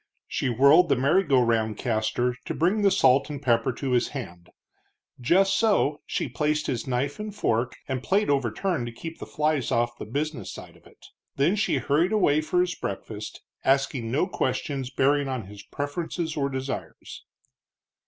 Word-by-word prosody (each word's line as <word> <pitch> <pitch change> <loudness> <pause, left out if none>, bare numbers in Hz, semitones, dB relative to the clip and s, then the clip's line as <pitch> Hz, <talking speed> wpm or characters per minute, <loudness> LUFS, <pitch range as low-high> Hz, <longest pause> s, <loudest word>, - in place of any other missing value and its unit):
She 135 - -1
whirled 140 +9 +5
the - - +4
merry 140 +9 +3
go 140 -6 +3
round 110 -2 0
caster 120 +1 0
to - - -4
bring 185 +6 +2
the 200 - +5
salt 135 -5 +3
and 145 -2 -5
pepper 125 -2 +2
to 135 +2 -4
his 125 -1 +2
hand; 90 -11 -8 0.7
just 185 +10 +3
so 200 -10 +2
she - - -2
placed 150 +5 -1
his 125 -3 -3
knife 135 +5 -1
and 210 -1 -6
fork, 120 - 0
and 130 -2 -2
plate 200 +8 +1
overturned 140 - 0
to - - -5
keep 165 +8 -8
the - - -7
flies 150 -4 0
off 120 0 0
the - - -5
business 145 - -3
side - - -11
of - - -20
it. - - -20 0.3
Then 150 +8 +2
she 210 - +1
hurried 165 +8 +1
away 155 -8 +3
for 180 +3 +1
his 180 -1 0
breakfast, 105 +2 -6 0.2
asking 135 -3 +1
no 140 +9 +1
questions 135 -5 -2
bearing 140 +2 +2
on 130 -5 -3
his 100 +1 -11
preferences 160 - -4
or 140 -2 0
desires. 130 0 -6
140 Hz, 175 wpm, -26 LUFS, 120-155 Hz, 0.7 s, whirled